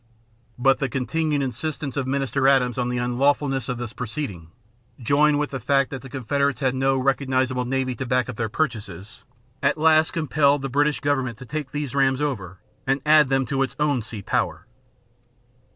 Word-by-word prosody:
But 135 +2 +3
the 135 - -1
continued 145 +3 -1
insistence 140 +1 -4
of 135 -2 -2
Minister 135 0 0
Adams 130 -2 +3
on 125 0 0
the 125 - -2
unlawfulness 135 +1 +1
of 125 - -2
this 120 -2 -6
proceeding, 110 - -5 0.5
joined 145 +4 +3
with 150 0 -1
the 135 - -4
fact 135 +3 +1
that 135 -3 -5
the 135 - -11
Confederates 140 +2 -1
had 130 -3 +1
no 135 0 +1
recognizable 130 -1 0
navy 130 0 -1
to 125 +2 -5
back 125 0 +1
up 130 - -6
their 115 0 -2
purchases, 105 - -4 0.4
at 140 +2 +2
last 160 0 +4
compelled 145 -3 +2
the 135 - -2
British 145 +3 +1
government 130 -5 0
to 125 - -10
take 150 +1 -4
these 145 -3 -4
rams 135 -1 +2
over 100 -12 -3 0.3
and 135 +1 +2
add 150 -2 +6
them 135 -1 +2
to 135 +2 -1
its 135 - -1
own 145 -4 +1
sea 110 -2 -7
power. - - -1
135 Hz, 185 wpm, -23 LUFS, 125-145 Hz, 0.5 s, add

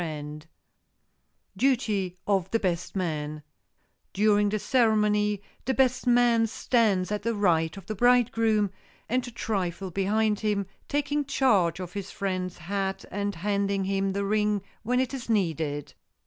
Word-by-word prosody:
[Sidenote: 150 -2 -6 1.1
DUTY 215 -9 +1
OF 190 -3 +1
THE 230 - +1
BEST 175 -2 -2
MAN] 155 -4 -3 0.7
During 205 0 +3
the 215 - 0
ceremony 210 -3 +2 0.2
the 265 +1 0
best 255 -1 +2
man 240 -2 +4
stands 210 -5 +1
at 210 - -1
the 230 0 -1
right 170 -4 +1
of 195 - -10
the 215 - -4
bridegroom, 230 -3 +3 0.4
and 250 +2 0
a - - -5
trifle 195 -5 -3
behind 210 +3 +1
him, 205 -2 0 0.2
taking 290 0 0
charge 210 - +2
of 180 -1 -6
his 200 -1 -5
friend's 185 -2 -3
hat 195 +2 -3
and 205 0 -2
handing 200 +2 0
him 195 0 0
the 200 0 -1
ring 210 -1 +1 0.2
when 250 +3 0
it 260 0 -1
is 255 -3 -6
needed. 160 -8 -1
205 Hz, 145 wpm, -27 LUFS, 185-225 Hz, 1.1 s, man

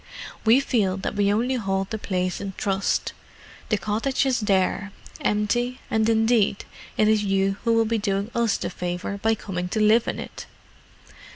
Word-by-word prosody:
"We 225 +4 +6
feel 210 -9 +1
that 190 - -3
we 200 0 +2
only 235 +5 +1
hold 195 -2 -2
the 220 - -3
place 185 -2 -2
in 195 -1 -5
trust; 195 -1 0 0.6
the 215 - +2
cottage 225 +7 0
is 255 -3 +1
there, 200 -1 +1 0.3
empty, 240 +5 0
and 220 0 +2
indeed 225 -2 +2 0.3
it 215 - +4
is 215 -1 +3
you 195 0 +1
who 230 - +2
will 225 0 +3
be 225 0 0
doing 200 +1 -1
us 235 -3 +1
the - - -4
favour 180 +3 -4
by 225 +2 +2
coming 180 -4 -4
to 215 - -1
live 215 +2 +4
in - - -2
it." - - -8
210 Hz, 175 wpm, -24 LUFS, 195-225 Hz, 0.6 s, We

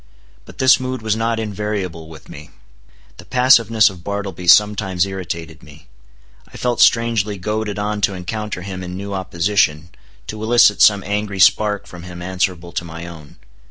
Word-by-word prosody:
But - - -15
this 130 0 +5
mood 130 -2 -5
was 110 -1 0
not 115 0 -1
invariable 100 -6 -4
with 80 - -13
me. 75 +1 -11 0.7
The - - -12
passiveness 115 -3 +4
of 90 -4 -5
Bartleby 100 -3 -5
sometimes 100 -1 +4
irritated 85 -5 -6
me. 75 0 -16 0.7
I - - -11
felt 120 -2 -1
strangely 115 -3 +2
goaded 105 +2 -3
on 105 0 -3
to 100 -1 +1
encounter 95 +1 -5
him 95 -1 -6
in 90 0 -7
new 100 +1 -6
opposition, 90 -3 0 0.4
to 110 0 -7
elicit 110 -3 +4
some 100 -2 +5
angry 105 0 -3
spark 105 +2 +3
from 90 - -11
him 90 0 -10
answerable 90 -1 -3
to 85 - -3
my 85 0 -8
own. 80 -4 -12
100 Hz, 160 wpm, -19 LUFS, 90-105 Hz, 0.7 s, this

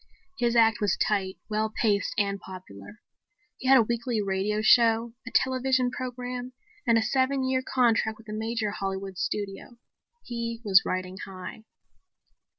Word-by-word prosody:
His 240 -1 +1
act 225 -2 +4
was 205 - +1
tight, 195 -3 0
well 215 0 0
paced 205 -3 +1
and 200 -1 0
popular. 185 - -11 0.6
He 260 - -4
had 265 0 +8
a 235 - +6
weekly 235 0 -1
radio 200 +1 0
show, 230 0 +4
a - - -5
television 260 -1 +2
program 250 0 -5 0.3
and 230 -1 +5
a 225 - +2
seven 265 +3 +1
year 260 0 +1
contract 230 -4 +1
with 225 - -17
a 210 - -6
major 220 0 -2
Hollywood 195 -1 -4
studio. 205 +3 -4 0.5
He 235 -1 -4
was 195 -1 +6
riding 185 0 -3
high. 195 +3 -9
225 Hz, 150 wpm, -27 LUFS, 200-245 Hz, 0.6 s, had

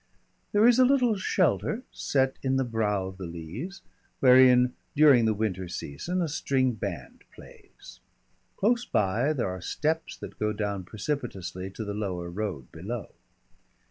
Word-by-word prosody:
There 210 +3 +5
is 245 +1 +5
a - - +8
little 250 -4 +3
shelter 180 - 0
set 135 -1 0
in 135 -1 0
the 135 - +2
brow 105 -5 -1
of 95 0 -8
the 90 - -5
Leas, 85 - -7 0.4
wherein, 125 -1 +6 0.2
during 140 -6 +6
the 110 - +3
winter 95 -4 -2
season, 170 - -3
a - - -1
string 135 -3 +1
band 110 - -6
plays. - - -15 0.6
Close 235 +4 +2
by 110 - +1
there 130 -10 -1
are 90 -1 -6
steps 160 - -2
that - - -10
go 105 0 0
down 100 -3 -3
precipitously 100 - -4
to 105 +3 -7
the 105 - -4
lower 90 -4 -4
road 90 -9 -4
below. 105 +8 -6
115 Hz, 150 wpm, -27 LUFS, 95-150 Hz, 0.6 s, a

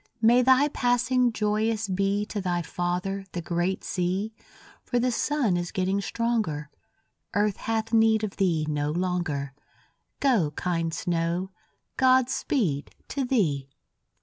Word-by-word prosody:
May 235 +2 +5
thy 260 +3 +5
passing 245 -1 +2
joyous 215 0 0
be 195 +2 0
To 210 -1 -4
thy 175 -2 -1
father, 180 +3 -2
the 175 - -3
great 175 +2 -1
sea, 190 +4 -1 0.5
For 245 - -1
the 250 +1 +2
sun 245 -5 +1
is 175 -1 -2
getting 190 +1 0
stronger; 210 -11 -1 0.6
Earth 205 -1 +2
hath 225 0 -2
need 220 -1 +4
of 205 -2 -4
thee 170 -6 +1
no 150 -1 -1
longer; 165 -5 -2 0.7
Go, 235 - +3
kind 165 -2 -1
snow, 170 +2 -1 0.5
God 260 -1 +4
speed 165 - -1
to 275 - -1
thee! 160 - 0
195 Hz, 130 wpm, -26 LUFS, 175-230 Hz, 0.7 s, May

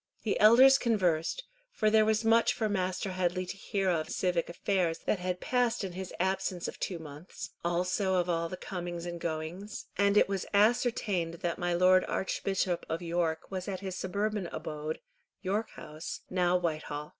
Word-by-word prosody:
The 215 - 0
elders 255 +6 +8
conversed, 185 - +1 0.3
for 215 - +1
there 215 0 +5
was 220 +1 +1
much 230 +1 +4
for 220 - 0
Master 185 -1 -1
Headley 185 0 0
to 180 - -6
hear 195 0 -2
of 160 -2 -1
civic 180 -3 0
affairs 175 -1 0
that 205 - +1
had 180 0 -2
passed 245 -1 +1
in 190 - -3
his 185 +1 -6
absence 190 -1 -1
of - - -7
two 180 - -2
months, 160 +5 -9
also 180 +3 +1
of 180 -1 +1
all 165 -1 0
the 185 - -6
comings 175 -2 -5
and 170 -1 -5
goings, 170 +6 -4
and 200 0 +4
it - - +6
was 195 -1 -3
ascertained 205 -6 +2
that 170 - -1
my 175 -1 0
Lord 185 +1 +5
Archbishop 190 -2 -1
of 165 +2 -2
York 165 -1 -1
was 185 -1 -4
at 195 -2 -4
his 190 -2 -4
suburban 200 +1 -2
abode, 155 -1 -5 0.5
York 205 +4 -1
House, 155 +2 -7
now 180 -1 +3
Whitehall. 155 -3 -3
185 Hz, 175 wpm, -30 LUFS, 170-200 Hz, 0.5 s, elders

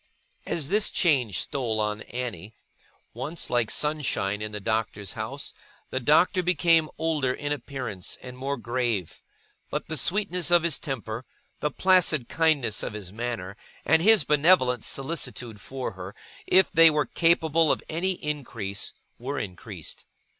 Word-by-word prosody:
As 155 -4 -1
this 210 +1 +3
change 125 - +2
stole 120 -5 -1
on 105 0 -1
Annie, 115 -4 -5 0.6
once 145 +8 -3
like 120 -2 +2
sunshine 135 -9 0
in 105 0 -4
the 105 - -5
Doctor's 105 -2 -2
house, - - -5 0.4
the 130 - -1
Doctor 155 +8 +4
became 170 -3 +3
older 155 -5 0
in 145 +2 -4
appearance, 130 -9 -4
and 125 0 -8
more 135 +2 -3
grave; 120 -6 -2 0.5
but - - -4
the 160 - -2
sweetness 180 +2 0
of 175 -1 +5
his 170 -4 +1
temper, 115 -4 -4 0.4
the 150 - 0
placid 180 -8 +3
kindness 150 -9 +2
of - - -4
his 100 -3 -7
manner, 115 -5 -4 0.3
and 160 - +4
his 220 +3 +6
benevolent 145 -6 +4
solicitude 130 -7 -2
for 130 +3 -4
her, 95 +1 -9 0.3
if 190 0 +5
they 165 0 +8
were 150 -1 +1
capable 165 -2 +3
of - - -1
any 180 +4 -1
increase, 120 -10 -4 0.2
were 135 +4 -4
increased. 90 -7 -7
135 Hz, 145 wpm, -26 LUFS, 110-160 Hz, 0.6 s, they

